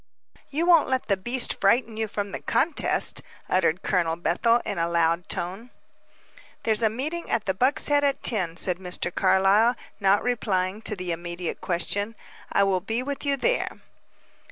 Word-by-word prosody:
"You 310 +4 -1
won't 340 -5 +5
let 260 -4 -1
the 200 - +4
beast 240 +6 -1
frighten 225 +3 +2
you 220 0 -2
from 205 -1 -4
the - - -4
contest!" 315 +1 +1 0.3
uttered 180 -1 +1
Colonel 170 -4 +1
Bethel 230 +8 +2
in - - -3
a 170 0 0
loud 170 +1 +1
tone. 190 +8 -4 0.9
"There's 220 -1 +3
a 220 - +4
meeting 300 +10 -4
at 220 - 0
the 190 - 0
Buck's 255 +9 +1
Head 290 0 +3
at 280 -1 0
ten," 180 -7 0
said 180 -1 +1
Mr. 180 -1 -3
Carlyle, 195 +5 +3 0.2
not 195 0 +3
replying 205 -5 -1
to 215 - -3
the 180 -2 -4
immediate 175 +1 -4
question. 200 +5 -2 0.4
"I 200 - +3
will 190 -2 +1
be 225 +6 -2
with 280 +1 -5
you 280 0 +2
there." - - 0
205 Hz, 170 wpm, -25 LUFS, 180-245 Hz, 0.9 s, won't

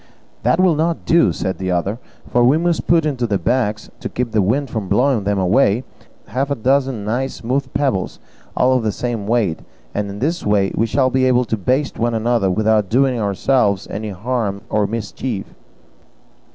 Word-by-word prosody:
"That 125 +8 +2
will 185 -2 +4
not 160 +2 -1
do," 170 0 +4
said 95 - -3
the 95 -1 -2
other, 95 +5 -1 0.3
"for 120 - +2
we 130 +5 +5
must 170 0 0
put 165 -2 +4
into 130 -5 -1
the 100 -2 +1
bags, 105 +2 -1
to - - -5
keep 125 -2 -3
the 110 -1 +2
wind 125 +7 0
from 110 -4 -3
blowing 120 0 +2
them 100 0 +1
away, 100 +4 +2 0.4
half 135 +3 -2
a 140 - 0
dozen 130 -2 0
nice 125 +5 -2
smooth 130 +3 -2
pebbles, 130 -10 0 0.4
all 130 +1 +4
of 130 - +2
the 110 -1 0
same 115 -3 -3
weight; 110 -8 +1 0.3
and 105 0 -2
in 100 - -7
this 155 +9 -1
way 100 -2 +2
we 115 - +1
shall 130 +3 +1
be 130 0 +2
able 125 -1 +3
to 115 - -1
baste 130 +8 -1
one 120 0 0
another 115 -3 +1
without 105 +1 +2
doing 130 +1 +2
ourselves 100 0 +1
any 105 +2 -4
harm 100 0 -2
or 105 -1 +2
mischief." 110 0 -4
115 Hz, 190 wpm, -19 LUFS, 105-130 Hz, 0.4 s, we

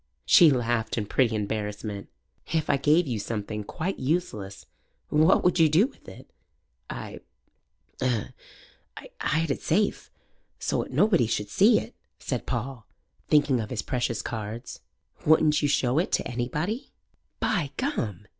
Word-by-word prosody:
She 170 -4 +8
laughed 120 -4 0
in 105 - -1
pretty 115 +1 +1
embarrassment. 105 -1 -4 0.4
"If 160 -1 +1
I - - +2
gave 155 +5 +3
you 120 -6 -2
something 105 0 -4
quite 175 - -4
useless, 120 - -2 0.4
what 155 +5 +4
would 180 0 +2
you 160 -1 +6
do 165 +9 +5
with 275 - -11
it?" - - -13 0.6
"I - - -7 0.8
'u'd - - -1 0.9
hide 160 -1 0
it - - -3
safe, 200 +6 0 0.5
so - - -1
'ut - - -7
nobody 180 - +3
should 105 -2 -2
see 215 +3 +5
it," - - -9 0.2
said 125 -3 -4
Paul, 120 -1 -4 0.4
thinking 145 -4 +3
of 110 -2 -4
his 115 -5 -3
precious 120 -3 -2
cards. 110 +1 -6 0.4
"Wouldn't 155 -1 +4
you 145 - +2
show 135 0 +2
it 175 - -1
to - - +1
anybody?" 150 - -3 0.5
"By 170 -8 0
Gum! 110 - -2
130 Hz, 145 wpm, -26 LUFS, 110-160 Hz, 0.9 s, She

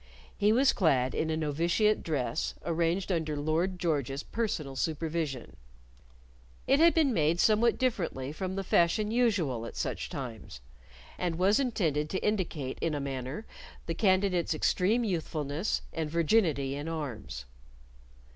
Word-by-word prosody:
He 205 +1 +3
was 260 +4 +4
clad 135 -8 +2
in 160 - -1
a 160 - 0
novitiate 170 +8 +1
dress, 155 -1 -2
arranged 170 +3 0
under 160 -4 -1
Lord 160 +5 0
George's 145 -5 -1
personal 165 -12 -3
supervision. 155 -3 -3 1.1
It 275 +2 +3
had 335 +1 +6
been 300 -6 +3
made 160 -2 +2
somewhat 225 +3 +4
differently 170 - -1
from 185 +4 -4
the 195 - -2
fashion 195 +5 +2
usual 200 - +1
at - - -10
such - - -3
times, 120 - -7 0.6
and 175 -2 -1
was 195 +6 +3
intended 165 - 0
to 190 - -2
indicate 170 -10 -2
in 160 -2 0
a - - -2
manner 135 - -4 0.4
the 165 - -2
candidate's 185 -3 +2
extreme 200 +9 +2
youthfulness 160 -3 -2
and 160 -2 -2
virginity 160 -5 +2
in 145 +2 -5
arms. 125 - -5
165 Hz, 135 wpm, -30 LUFS, 145-200 Hz, 1.1 s, had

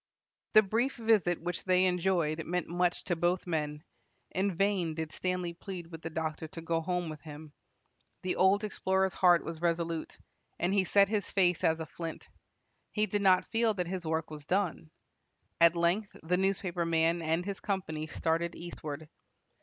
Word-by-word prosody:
The 215 - +8
brief 230 +7 0
visit 215 -7 +2
which 175 0 -3
they 185 0 +4
enjoyed 175 -3 +1
meant 180 +2 -2
much 175 0 0
to 175 - -1
both 175 +2 0
men. 150 -3 -2 0.5
In 195 +2 0
vain 190 -4 +1
did 160 -1 -4
Stanley 180 -1 -2
plead 180 0 -7
with 165 -1 -8
the 165 - -4
doctor 160 0 -3
to 165 +1 -9
go 165 0 0
home 180 0 -1
with 155 -2 -7
him. 150 -1 -10 0.7
The 185 - -1
old 190 +3 +4
explorer's 190 -2 0
heart 175 -2 +5
was 165 -1 -6
resolute, 170 -1 -1 0.4
and 175 +3 0
he 195 -2 +3
set 200 +2 +5
his 210 -2 -1
face 180 -4 +2
as 160 0 +3
a 160 - -3
flint. 165 0 -7 0.6
He 210 0 +1
did 205 0 -1
not 185 -2 +4
feel 225 -1 +2
that 180 -2 -1
his 185 0 -4
work 160 0 -2
was 150 -1 -9
done. 180 - 0 0.7
At 170 0 +6
length 175 +5 0
the 175 +3 +1
newspaper 185 -2 0
man 165 +1 +2
and 165 +2 0
his 200 -1 -4
company 160 -6 -3
started 165 +2 -1
eastward. 155 -3 -7
175 Hz, 175 wpm, -31 LUFS, 160-190 Hz, 0.7 s, The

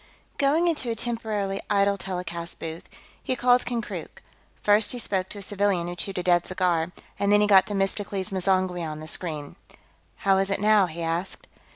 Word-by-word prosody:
Going 300 +5 +3
into 305 -7 +2
a 230 - -1
temporarily 220 -4 -2
idle 200 0 +3
telecast 180 -3 -5
booth, 165 +1 -7 0.3
he 255 - -1
called 245 0 +3
Konkrook. 235 -3 -5 0.4
First 210 +2 +4
he - - -4
spoke 190 -5 -2
to - - -6
a 200 - -6
civilian 195 -3 0
who 175 - -5
chewed 190 +2 -3
a 180 - -1
dead 175 -1 +3
cigar, 180 -3 0 0.3
and 200 0 +2
then 205 - +6
he - - +4
got 195 -2 +6
Themistocles 195 -1 -2
M'zangwe 185 -1 0
on 155 -2 -5
the 155 - -8
screen. 155 -4 -3 0.7
"How 195 -1 +5
is 195 0 0
it, 195 - 0
now?" 210 -2 +4
he 170 0 -6
asked. 165 +3 -3
195 Hz, 185 wpm, -25 LUFS, 175-210 Hz, 0.7 s, then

